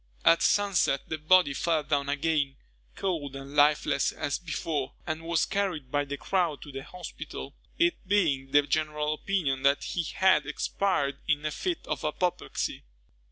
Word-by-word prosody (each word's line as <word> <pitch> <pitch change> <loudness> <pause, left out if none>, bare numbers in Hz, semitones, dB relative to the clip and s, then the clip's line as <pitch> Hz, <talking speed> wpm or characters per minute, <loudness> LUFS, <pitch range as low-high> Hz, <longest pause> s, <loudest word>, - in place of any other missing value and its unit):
At 165 - +6
sunset, 200 -9 +2
the 160 - -3
body 155 -1 +5
fell 160 0 +1
down 140 -1 0
again, 145 -1 0 0.4
cold 155 -8 -2
and 135 +1 -8
lifeless 145 -1 +3
as 145 - -2
before, 155 -5 -3
and 155 -1 -3
was 165 0 +1
carried 185 -10 -2
by 145 0 +1
the 140 0 -5
crowd 175 -5 0
to 145 - -10
the 135 0 -6
hospital, 180 +4 -8 0.2
it 345 0 +3
being 155 -10 +2
the 145 +1 +5
general 150 0 0
opinion 155 -6 -1
that 140 +1 +3
he 175 - -2
had 190 0 +4
expired 140 -9 -1
in 150 -1 +1
a 155 - 0
fit 355 - -3
of - - -3
apoplexy. 175 +4 -2
155 Hz, 160 wpm, -28 LUFS, 140-180 Hz, 0.4 s, At